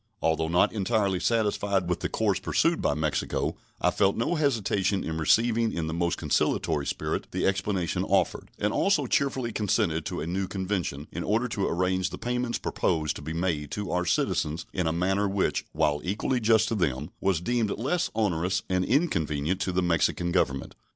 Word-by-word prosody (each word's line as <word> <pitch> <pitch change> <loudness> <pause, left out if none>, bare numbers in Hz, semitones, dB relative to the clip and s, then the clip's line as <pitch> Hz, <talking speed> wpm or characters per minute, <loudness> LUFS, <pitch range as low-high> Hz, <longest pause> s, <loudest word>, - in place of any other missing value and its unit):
Although 80 0 +1
not 85 +2 +3
entirely 100 -3 +1
satisfied 105 -4 +1
with 90 - -1
the - - -2
course 100 -4 +1
pursued 165 - +1
by - - +1
Mexico, 75 0 -1 0.2
I - - +2
felt 100 -1 +2
no 115 +9 0
hesitation 105 - +1
in 80 0 -3
receiving 115 +7 +3
in 85 - -2
the 80 - -3
most 85 +1 0
conciliatory 70 -1 0
spirit - - -2
the - - -1
explanation 95 -3 0
offered, - - +1
and 105 +1 0
also 200 0 +2
cheerfully 135 -4 0
consented 95 -7 0
to - - -4
a 75 - -3
new 95 +3 -2
convention, 95 -7 -3
in 85 - -4
order 115 +4 +1
to 100 -3 -1
arrange 90 +1 0
the - - -7
payments 125 0 -1
proposed 75 -2 -1
to - - -9
be 80 +3 -5
made 80 -4 -1
to 105 -2 -3
our 90 0 0
citizens 80 0 0
in 90 -4 0
a - - +2
manner 95 +4 +1
which, 95 0 0
while 75 -1 +1
equally 105 +7 0
just 110 -1 +4
to - - -1
them, 75 - -1
was 95 -4 +1
deemed 115 +3 0
less 150 - -1
onerous 95 -3 0
and 95 0 +1
inconvenient 90 - 0
to 95 - 0
the 90 0 +1
Mexican 85 0 +1
Government. 70 -7 0
95 Hz, 185 wpm, -27 LUFS, 85-110 Hz, 0.2 s, just